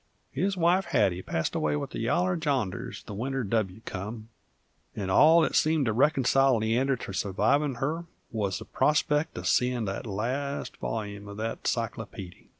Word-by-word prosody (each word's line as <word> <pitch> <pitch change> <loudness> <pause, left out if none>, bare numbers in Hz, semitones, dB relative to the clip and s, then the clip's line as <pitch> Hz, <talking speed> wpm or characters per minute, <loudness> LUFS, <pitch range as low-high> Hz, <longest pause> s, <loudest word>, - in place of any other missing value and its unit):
His 190 +7 -1
wife, 175 +2 +3
Hattie, 90 -1 +1
passed 80 -3 -2
away 75 -1 0
with 75 - -4
the - - -5
yaller 175 +11 +1
janders 140 - -2
the - - -8
winter 130 +5 -2
W 105 -1 -1
come, 110 +4 -6 0.7
and 95 -2 -3
all 160 - +7
that 155 - +1
seemed 155 -2 +3
to 110 - +1
reconcile 135 0 +3
Leander 120 +5 +1
to 105 -5 -7
survivin' 110 +9 +1
her 155 +7 -2 0.3
wuz 105 -4 -1
the - - -8
prospect 150 +2 +1
uv - - -6
seein' 125 -2 +2
the 95 -1 -3
last 130 +8 -3
volyume 100 -2 -4
of 100 0 -8
that 115 +1 -3
cyclopeedy. 105 -5 -4
120 Hz, 160 wpm, -28 LUFS, 100-145 Hz, 0.7 s, all